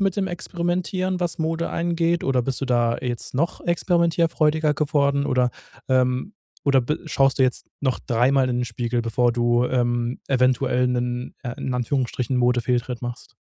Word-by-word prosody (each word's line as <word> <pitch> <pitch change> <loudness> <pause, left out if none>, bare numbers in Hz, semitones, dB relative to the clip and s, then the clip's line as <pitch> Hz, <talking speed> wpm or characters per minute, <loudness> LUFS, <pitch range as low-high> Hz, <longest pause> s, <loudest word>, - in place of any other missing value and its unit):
mit 195 -1 +1
dem 195 -1 0
Experimentieren, 180 +1 -2
was 175 -2 -1
Mode 165 +1 -1
angeht? 170 0 0
Oder 130 -2 +2
bist 135 +2 -2
du - - -1
da 120 -2 +2
jetzt 125 0 -4
noch 165 +6 -1
experimentierfreudiger 165 -3 +2
geworden? 140 -1 +1
Oder, 125 -1 +2 0.4
ähm, 130 +7 +1 0.3
oder 135 -2 +4
be 150 +5 -2
schaust 135 -3 +2
du 135 - +4
jetzt 130 -1 0
noch 130 -3 0
3-mal 130 +2 +3
in 120 - 0
den 125 - 0
Spiegel, 120 +1 -2
bevor 120 +1 +1
du, 120 0 +2
ähm, 120 -1 0
eventuell 125 -1 +2
'nen, 125 0 -2
äh, 120 -2 -4
in 130 - -3
Anführungsstrichen 125 0 -1
Modefehltritt 125 0 +1
machst? 120 0 -7
130 Hz, 160 wpm, -23 LUFS, 125-160 Hz, 0.4 s, oder